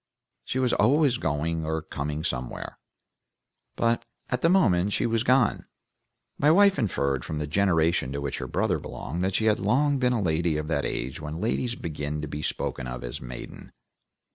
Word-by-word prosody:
She - - -2
was 130 -2 +2
always 130 +2 +3
going 80 +2 -1
or 80 0 -2
coming 75 0 -4
somewhere, 60 -6 -4 1.0
but 115 0 +1 0.3
at 125 -1 -1
the 165 - +4
moment 105 - +3
she - - +1
was 115 -1 +1
gone. 125 -2 +3 0.7
My 145 - +4
wife 195 +1 +5
inferred 70 - 0
from 80 - -4
the 75 - -2
generation 80 -4 +2
to 70 - -2
which 70 -1 -3
her 65 - -4
brother - - 0
belonged 85 +7 -5
that 95 0 0
she 110 - +1
had 105 -1 +3
long 135 +7 +2
been 125 -1 +2
a 120 - +1
lady 85 -3 +1
of 75 0 -3
that 80 - 0
age 65 +5 -4
when 75 +2 -5
ladies 115 +3 -1
begin 75 -4 -4
to - - -3
be 75 +1 -5
spoken 65 -3 -3
of 60 0 -6
as - - -6
maiden. 60 0 -9
85 Hz, 185 wpm, -26 LUFS, 75-120 Hz, 1.0 s, wife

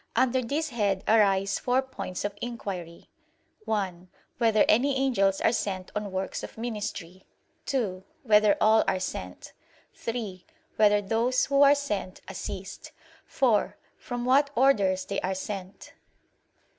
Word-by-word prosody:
Under 255 +1 +2
this 295 +6 -2
head 205 -6 0
arise 195 -3 +3
four 255 +2 +1
points 195 -8 -6
of 205 - -2
inquiry: 190 -8 -6 0.5
(1) 190 -5 -3 0.3
Whether 225 -3 +4
any 265 +5 +3
angels 200 -8 +2
are - - +3
sent 190 -5 -3
on 210 -1 -3
works 190 0 -3
of - - -9
ministry? 210 -6 -5 0.4
(2) 200 -9 -1 0.2
Whether 210 -3 +4
all 220 +1 +5
are 185 - +1
sent? 90 - -6 0.4
(3) 220 -6 -5 0.3
Whether 210 -1 +4
those 230 +5 +1
who 280 0 +2
are 285 0 +7
sent, 205 -10 -4
assist? - - -7 0.3
(4) 235 -6 +1 0.2
From 245 -1 -5
what 275 +3 +4
orders 200 -8 +3
they 200 - -3
are 190 +1 -2
sent. 190 0 -7
210 Hz, 130 wpm, -27 LUFS, 190-245 Hz, 0.5 s, are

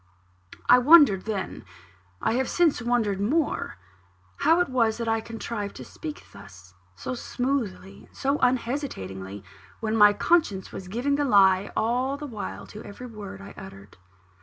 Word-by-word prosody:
I 250 - +8
wondered 275 - +6
then 210 -4 -4 0.6
I - - +2
have 260 +2 0
since 335 -8 +2
wondered 225 -5 0
more 285 - -1 0.6
how 330 +2 +4
it 355 - +2
was 230 -4 +1
that 230 -1 -4
I 225 0 +1
contrived 225 -2 -5
to - - -9
speak 310 -2 -8
thus, 95 -3 -14 0.2
so 100 - -5
smoothly 245 -6 -3
and - - -22
so 275 +2 0
unhesitatingly, 165 - -2 0.4
when 220 0 -1
my 210 -1 +7
conscience 205 - +1
was 185 - -8
giving 250 +8 -1
the 290 - +1
lie 195 -4 +4
all 250 +5 0
the 295 - -7
while 225 -7 -6
to 210 - -9
every 225 +5 -9
word 205 -4 -9
I 200 - -10
uttered. 105 - -12
225 Hz, 155 wpm, -26 LUFS, 195-265 Hz, 0.6 s, I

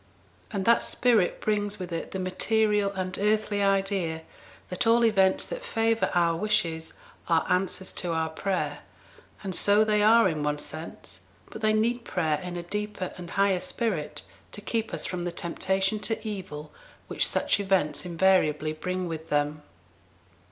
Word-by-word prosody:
And 190 - -3
that 235 0 +5
spirit 230 -8 +2
brings 205 -1 0
with 180 -2 -6
it 165 - -4
the - - -5
material 205 +2 +1
and 185 -1 -3
earthly 210 0 +1
idea 195 -5 0 0.5
that 180 +5 -1
all 235 +1 +5
events 195 -4 +3
that - - -6
favour 225 - +1
our 170 -1 +3
wishes 170 -5 -1 0.3
are 165 -1 +2
answers 185 0 -1
to 175 - -2
our 160 -1 0
prayer; 185 +4 -2 0.6
and 190 -2 -3
so 205 +4 +4
they 210 -1 +2
are 225 +1 +6
in 155 -4 -2
one 150 0 0
sense, 155 +2 -7 0.3
but 220 - -8
they 215 0 +3
need 235 +3 +1
prayer 155 -7 0
in 180 +1 -6
a 175 - -4
deeper 210 0 -4
and 175 -1 -9
higher 195 -1 +2
spirit 185 -6 -3 0.3
to - - -6
keep 225 +1 -2
us - - -3
from 180 -1 -3
the 175 - -2
temptation 190 +4 -1
to 225 +1 -2
evil 165 -8 -6 0.4
which - - +1
such - - +1
events 165 -7 +1
invariably 165 -4 +2
bring 180 +3 -3
with 160 -1 -6
them. 150 +1 0
190 Hz, 160 wpm, -27 LUFS, 170-210 Hz, 0.6 s, are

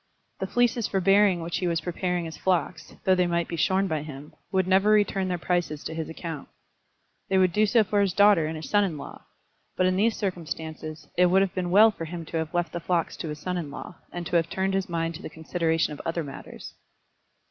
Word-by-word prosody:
The - - -2
fleeces 245 -2 +1
for 195 - 0
bearing 195 -1 +4
which 170 +1 -2
he 180 - -1
was 170 -1 +1
preparing 175 +1 -2
his 160 - -7
flocks, 170 -3 -1
though 190 - +4
they 180 -1 +2
might 170 0 0
be 170 - -4
shorn 190 +4 +2
by 155 -5 -1
him, 150 -1 -9 0.2
would 190 -2 +2
never 190 +2 +4
return 205 -3 +3
their 180 -1 -1
prices 170 -3 -1
to 160 - -5
his 160 -1 -4
account. 160 -2 -7 0.8
They 190 - +3
would 185 -2 +3
do 215 0 +3
so 225 +1 +4
for 205 0 +1
his 200 -2 +2
daughter 200 -4 +5
and 160 - -4
his 155 - -6
son 205 0 +3
in 175 -6 -2
law; 140 - -10 0.5
but 185 - +3
in 185 0 +2
these 220 +3 +2
circumstances, 160 -5 -5
it 180 0 +6
would 190 +2 +4
have 190 - -2
been 180 -2 -2
well 215 +5 +7
for 165 -5 -6
him 165 0 -6
to 165 - -4
have 160 -1 -2
left 175 -1 -1
the 175 - -2
flocks 170 -1 -1
to - - -5
his 150 - -5
son 180 +4 -3
in 155 -4 -5
law, 165 +4 -9
and 175 0 -5
to 175 - +2
have 165 0 0
turned 190 0 -1
his 195 -1 -1
mind 165 -1 -1
to 165 - -9
the - - -6
consideration 160 -1 -1
of 145 - -8
other 165 0 -2
matters. 140 - -9
175 Hz, 240 wpm, -26 LUFS, 160-190 Hz, 0.8 s, well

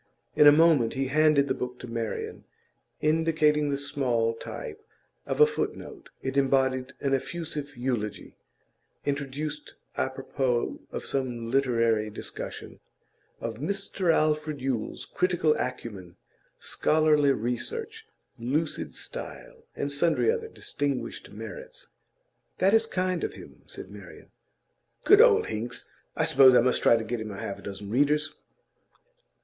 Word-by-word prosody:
In 150 - +7
a - - +11
moment 150 -6 +4
he 135 0 -1
handed 150 -1 +4
the 130 - 0
book 125 -1 -5
to 125 - -9
Marian, 115 -1 -4 0.6
indicating 155 -1 +2
the 140 - 0
small 130 -5 0
type 430 - -8 0.5
of - - -2
a 450 - +9
foot 450 0 -2
note; 385 -6 -11
it 135 +1 -2
embodied 130 -1 +2
an 135 -1 0
effusive 150 -1 -3
eulogy 120 -4 -3 0.7
introduced 145 +2 -4 0.2
a 130 - 0
propos 130 -2 -1
of - - -5
some 120 -4 -2
literary 115 -5 +2
discussion 105 - -8 0.6
of 115 -1 -4
'Mr 190 - -1
Alfred 155 -1 +1
Yule's 130 -4 -3
critical 175 -4 +1
acumen, 105 -8 -5 0.4
scholarly 150 -2 +3
research, 440 - -4 0.3
lucid 145 +7 -2
style,' - - -8
and 140 - -2
sundry 165 - +2
other 460 -1 -3
distinguished 145 - -4
merits. - - -9 0.7
'That 195 +2 +3
is 225 0 +4
kind 185 -4 -1
of - - -2
him,' - - -13
said - - -7
Marian. - - -12 0.7
'Good 415 +1 +8
old 460 -3 +6
Hinks! 115 +3 -5 0.3
I - - +1
suppose 130 -2 +7
I - - +7
must 125 +1 +1
try - - +6
to 115 - -3
get 115 +1 -3
him 110 - -5
half 100 0 -5
a - - -12
dozen 100 +1 -7
readers. 150 +5 +2
140 Hz, 135 wpm, -27 LUFS, 125-165 Hz, 0.7 s, a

